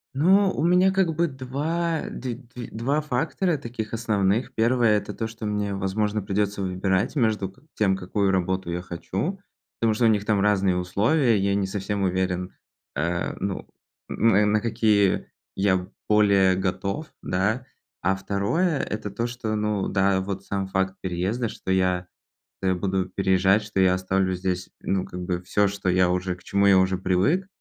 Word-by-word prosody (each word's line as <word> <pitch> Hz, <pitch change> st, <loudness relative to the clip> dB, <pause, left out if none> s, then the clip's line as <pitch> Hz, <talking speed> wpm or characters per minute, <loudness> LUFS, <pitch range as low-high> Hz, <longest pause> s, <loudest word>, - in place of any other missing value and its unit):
Ну, 190 Hz, +7 st, +4 dB
у 150 Hz, -, -2 dB
меня 180 Hz, +2 st, +4 dB
как 190 Hz, -4 st, +1 dB
бы 170 Hz, +2 st, +2 dB
2 155 Hz, +5 st, -2 dB
д 125 Hz, -2 st, -4 dB
2, 120 Hz, -1 st, -9 dB
2 130 Hz, +7 st, 0 dB
фактора 155 Hz, +5 st, 0 dB
таких 115 Hz, -4 st, -6 dB
основных. 110 Hz, 0 st, 0 dB
Первое, 115 Hz, -1 st, +3 dB
это -, -, -5 dB
то, 115 Hz, -, -3 dB
что 115 Hz, 0 st, -8 dB
мне, 105 Hz, -1 st, -1 dB
возможно, 105 Hz, +2 st, -1 dB
придётся 100 Hz, +1 st, -1 dB
выбирать 95 Hz, +4 st, 0 dB
между 110 Hz, -7 st, +1 dB
как 130 Hz, -, -24 dB
тем, 95 Hz, -3 st, +2 dB
какую 95 Hz, +1 st, 0 dB
работу 95 Hz, -1 st, -1 dB
я 85 Hz, +1 st, -2 dB
хочу, 95 Hz, -, -4 dB, 0.4 s
потому 115 Hz, -1 st, +2 dB
что 115 Hz, +2 st, +1 dB
у -, -, +7 dB
них 105 Hz, -2 st, +2 dB
там 105 Hz, -2 st, +2 dB
разные 100 Hz, -3 st, +2 dB
условия. 110 Hz, -, +2 dB
Я 100 Hz, 0 st, +1 dB
не 100 Hz, -1 st, 0 dB
совсем 100 Hz, +1 st, -3 dB
уверен, 90 Hz, -1 st, -1 dB, 0.4 s
э, 85 Hz, +4 st, -1 dB
ну, 95 Hz, 0 st, -3 dB, 0.4 s
н 105 Hz, -2 st, +3 dB
на 110 Hz, 0 st, +2 dB
какие 105 Hz, -3 st, +2 dB, 0.3 s
я 95 Hz, -2 st, +1 dB, 0.2 s
более 100 Hz, -3 st, +4 dB
готов, 95 Hz, -, -3 dB
да? 110 Hz, +7 st, 0 dB, 0.4 s
А 95 Hz, +2 st, +2 dB
второе, 100 Hz, -, 0 dB
это 105 Hz, -4 st, -4 dB
то, 115 Hz, +4 st, -2 dB
что, 120 Hz, -3 st, -3 dB
ну 105 Hz, -2 st, 0 dB
да, 95 Hz, -1 st, +2 dB
вот 95 Hz, 0 st, -4 dB
сам 100 Hz, 0 st, -3 dB
факт 95 Hz, 0 st, -1 dB
переезда, 95 Hz, +7 st, -1 dB
что 95 Hz, -, -5 dB
я, 90 Hz, -1 st, +1 dB, 0.6 s
э, 95 Hz, -1 st, +2 dB
буду 95 Hz, 0 st, -1 dB
переезжать, 95 Hz, +2 st, +2 dB
что 105 Hz, -2 st, -2 dB
я 95 Hz, -1 st, +5 dB
оставлю 95 Hz, 0 st, 0 dB
здесь, 90 Hz, 0 st, -2 dB
ну, 95 Hz, -1 st, 0 dB
как 90 Hz, -, -7 dB
бы, 90 Hz, 0 st, -2 dB
всё, 100 Hz, +3 st, +2 dB
что 100 Hz, -1 st, -4 dB
я 90 Hz, 0 st, +3 dB
уже 90 Hz, 0 st, -1 dB
к 90 Hz, -, -20 dB
чему 100 Hz, +2 st, +1 dB
я 100 Hz, -1 st, +6 dB
уже 95 Hz, 0 st, +2 dB
привык. 95 Hz, -, +1 dB
100 Hz, 170 wpm, -25 LUFS, 95-115 Hz, 0.6 s, у